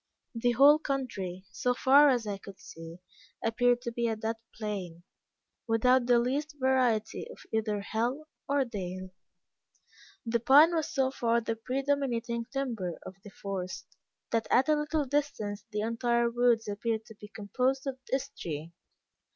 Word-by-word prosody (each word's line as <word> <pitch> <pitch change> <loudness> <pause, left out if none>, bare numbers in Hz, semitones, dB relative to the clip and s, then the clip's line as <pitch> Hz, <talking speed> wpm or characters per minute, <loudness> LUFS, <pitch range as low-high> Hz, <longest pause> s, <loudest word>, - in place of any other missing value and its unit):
The 240 +1 +1
whole 285 +5 +7
country, 200 - -4
so 245 +7 0
far 280 +3 +6
as 245 -4 +1
I 200 -2 -4
could 195 -1 -12
see, 165 +1 -10 0.5
appeared 245 +2 +2
to 235 - -3
be 235 0 -1
a 225 - 0
dead 220 +1 -3 0.2
plain, 190 -6 -5 0.6
without 245 +2 +3
the 245 -1 +5
least 285 +5 -1
variety 255 - +1
of 485 - -11 0.2
either 215 -2 0
hill 240 +8 -2 0.2
or 280 -1 +2
dale. 185 -5 -6 1.1
The 235 0 +1
pine 290 +8 +7
was 320 -2 0
so 265 -1 +1
far 235 -3 +1
the 225 0 -3
predominating 245 -2 -1
timber 230 -11 -3
of 190 - -8
the 205 - -10
forest, 195 -2 -5 0.5
that 225 -1 0
at 260 +4 +3
a 305 - +5
little 300 0 -1
distance 240 -8 -2
the 210 -1 -2
entire 235 +1 +1
woods 240 -2 +2
appeared 220 +2 -2
to - - -12
be 210 - -8
composed 250 +7 -1
of 265 -1 -4
this 275 +1 0
tree. 165 - -6
235 Hz, 155 wpm, -29 LUFS, 210-265 Hz, 1.1 s, whole